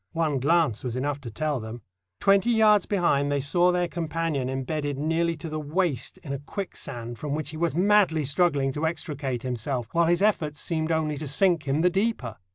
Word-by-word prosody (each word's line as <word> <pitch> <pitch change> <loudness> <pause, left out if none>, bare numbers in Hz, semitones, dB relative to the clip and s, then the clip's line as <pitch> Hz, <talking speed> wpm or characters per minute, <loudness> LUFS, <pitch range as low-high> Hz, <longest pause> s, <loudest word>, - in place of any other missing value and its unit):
One 160 -4 0
glance 155 -4 +2
was 125 -2 -3
enough 140 +2 -2
to 125 - -7
tell 150 +4 -2
them. 110 0 -8 0.4
Twenty 195 +3 +4
yards 215 -4 +4
behind 145 -8 +1
they 145 - +1
saw 175 +6 +3
their 180 0 +1
companion 165 -5 -2
embedded 145 +2 -3
nearly 165 +3 0
to 165 +1 -8
the 155 0 -4
waist 150 -4 -1
in 140 - -5
a 140 - -3
quicksand, 120 - -6
from 145 +1 -3
which 155 -1 -4
he 155 - -7
was 165 -2 0
madly 185 -5 +3
struggling 140 -2 +2
to 150 +4 -1
extricate 140 -6 -4
himself, 125 -1 -2
while 170 0 +3
his 175 +3 +2
efforts 155 -8 +1
seemed 160 -2 -1
only 155 -2 0
to 150 +1 -5
sink 165 +2 +2
him 140 +3 +1
the 180 +1 +3
deeper. 190 - -1
155 Hz, 195 wpm, -26 LUFS, 140-170 Hz, 0.4 s, Twenty